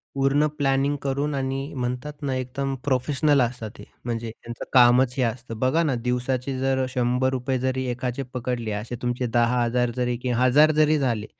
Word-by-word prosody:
पूर्ण 135 Hz, +2 st, +2 dB
प्लॅनिंग 140 Hz, 0 st, +1 dB
करून 140 Hz, +2 st, -1 dB
आणि 135 Hz, +1 st, -3 dB
म्हणतात 125 Hz, +3 st, -3 dB
ना, 135 Hz, -2 st, -1 dB
एकदम 130 Hz, +2 st, -3 dB
प्रोफेशनल 140 Hz, +2 st, +2 dB
असतात 115 Hz, -3 st, -3 dB
ते, -, -, -10 dB, 0.2 s
म्हणजे 115 Hz, -1 st, -3 dB
त्यांचं 115 Hz, +1 st, -9 dB
कामच 125 Hz, 0 st, +5 dB
हे 130 Hz, -, +1 dB
असतं. 115 Hz, 0 st, -4 dB
बघा 130 Hz, +7 st, +2 dB
ना, 150 Hz, -5 st, +1 dB
दिवसाचे 125 Hz, +1 st, -1 dB
जर 130 Hz, 0 st, +1 dB
₹100 125 Hz, +1 st, +1 dB
रुपये 130 Hz, 0 st, -1 dB
जरी 130 Hz, +1 st, -1 dB
एकाचे 125 Hz, +2 st, -3 dB
पकडले. 120 Hz, -3 st, -3 dB
असे 105 Hz, +4 st, -4 dB
तुमचे 120 Hz, 0 st, -1 dB
10000 120 Hz, +1 st, +1 dB
जरी 125 Hz, -1 st, 0 dB
की 125 Hz, -, -1 dB
1000 145 Hz, +5 st, +5 dB
जरी 155 Hz, 0 st, +4 dB
झाले, 115 Hz, -6 st, -1 dB
130 Hz, 170 wpm, -24 LUFS, 120-135 Hz, 0.2 s, कामच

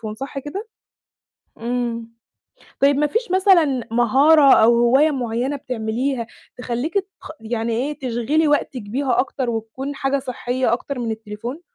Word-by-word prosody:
صح 275 Hz, +4 st, -6 dB
كده؟ 380 Hz, -, -7 dB, 0.9 s
امم. 235 Hz, -1 st, -3 dB, 0.7 s
طيب 280 Hz, 0 st, +4 dB
مفيش 355 Hz, +10 st, 0 dB
مثلًا 340 Hz, -, +3 dB
مهارة 270 Hz, +5 st, +5 dB
أو 225 Hz, +2 st, +5 dB
هواية 265 Hz, +6 st, +4 dB
معيّنة 250 Hz, 0 st, -2 dB
بتعمليها 245 Hz, 0 st, -3 dB, 0.3 s
تخليكِ 250 Hz, -, -3 dB, 0.3 s
تـخ -, -, -10 dB
يعني 225 Hz, +1 st, -2 dB
إيه 270 Hz, +6 st, -2 dB
تشغِلِي 265 Hz, +5 st, 0 dB
وقتِك 280 Hz, -4 st, 0 dB
بيها 245 Hz, +4 st, -1 dB
أكتر 260 Hz, -1 st, -2 dB
وتكون 230 Hz, +5 st, -5 dB
حاجة 275 Hz, 0 st, 0 dB
صحّية 250 Hz, -1 st, -2 dB
أكتر 255 Hz, +3 st, -3 dB
من 235 Hz, -2 st, -2 dB
التليفون؟ 220 Hz, +6 st, -6 dB
255 Hz, 130 wpm, -21 LUFS, 235-285 Hz, 0.9 s, مهارة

